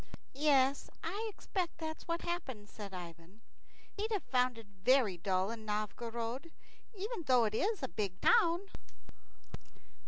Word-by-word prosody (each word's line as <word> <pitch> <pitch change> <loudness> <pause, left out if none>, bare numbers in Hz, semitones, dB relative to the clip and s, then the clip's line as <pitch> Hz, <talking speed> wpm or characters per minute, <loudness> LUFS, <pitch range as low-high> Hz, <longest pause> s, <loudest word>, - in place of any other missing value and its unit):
"Yes, 275 -1 +3
I 405 +7 -2
expect 370 -3 -3
that's 315 0 -5
what 335 0 -1
happened," 270 -12 -3
said 205 -2 -8
Ivan. 175 +2 -9 0.5
"He'd 430 +2 -2
have 415 -4 0
found 250 -2 +2
it 225 - -10 0.2
very 250 -5 +5
dull 185 +2 +1
in 230 -1 -6
Novgorod, 230 +6 -3 0.5
even 415 +1 -3
though 250 -2 +6
it 215 - -1
is 400 - +1
a - - +1
big 200 -6 -3
town." 380 -8 +5
255 Hz, 135 wpm, -35 LUFS, 210-340 Hz, 0.5 s, though